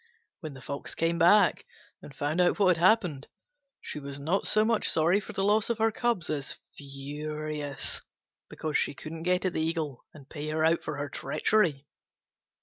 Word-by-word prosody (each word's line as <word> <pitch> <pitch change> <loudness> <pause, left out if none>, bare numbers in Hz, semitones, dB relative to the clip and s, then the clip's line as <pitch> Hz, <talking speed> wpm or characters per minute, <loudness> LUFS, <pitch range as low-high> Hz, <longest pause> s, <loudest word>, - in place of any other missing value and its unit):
When 155 -5 -7
the 130 - -11
Fox 140 0 -5
came 165 +1 0
back, 200 - +5 0.3
and 140 - -12
found 150 +6 0
out 175 - +3
what 185 -3 +4
had 165 - -4
happened, 180 -9 +3 0.5
she - - -6
was 140 0 -7
not 165 +8 0
so 215 0 +3
much 225 -1 +1
sorry 170 +5 +3
for - - -9
the 195 - -1
loss 210 +2 +3
of 235 - 0
her 225 0 +2
cubs 230 -7 0
as 145 -3 -3 0.2
furious 145 +1 -4 0.5
because 155 -1 -1
she - - -1
couldn't 160 +3 -7
get 180 +2 +1
at 185 - 0
the - - -1
Eagle 160 -5 -2
and 140 -3 -15
pay 150 +1 -6
her 155 +1 +1
out 165 +1 +3
for 150 -3 -4
her 145 0 -3
treachery. 150 -1 0
160 Hz, 185 wpm, -28 LUFS, 145-185 Hz, 0.5 s, back